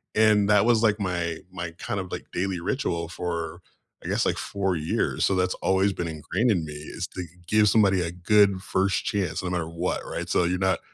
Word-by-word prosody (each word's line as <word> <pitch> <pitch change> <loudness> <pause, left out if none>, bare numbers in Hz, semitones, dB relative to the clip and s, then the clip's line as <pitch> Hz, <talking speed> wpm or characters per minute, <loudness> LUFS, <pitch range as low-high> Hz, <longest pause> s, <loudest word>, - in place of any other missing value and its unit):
And 105 -2 +4
that 105 0 +5
was, 115 -2 +3
like, 110 -1 +3
my 85 -4 -1 0.2
my 85 -2 -4
kind 100 - -3
of 95 -1 -6
like - - -5
daily 95 0 -1
ritual 85 - -1
for, 85 -2 -4 0.4
I - - -6
guess, - - +1
like, - - +1
4 95 -2 -1
years, 80 -1 0
so 100 - +2
that's 90 0 +1
always 95 +1 +2
been 85 - -3
ingrained 95 +9 0
in 85 -5 0
me 75 - -7
is 75 +1 -6
to 90 - -3 0.2
give 105 +1 +4
somebody 95 -4 +4
a 85 - -2
good 100 +2 +3
first 95 0 0
chance 95 -4 -1
no 90 - -2
matter 85 -3 -1
what, 85 +2 -2
right? - - -5
So, - - +3
you're 90 +1 0
not 95 0 +2
95 Hz, 215 wpm, -26 LUFS, 85-100 Hz, 0.4 s, that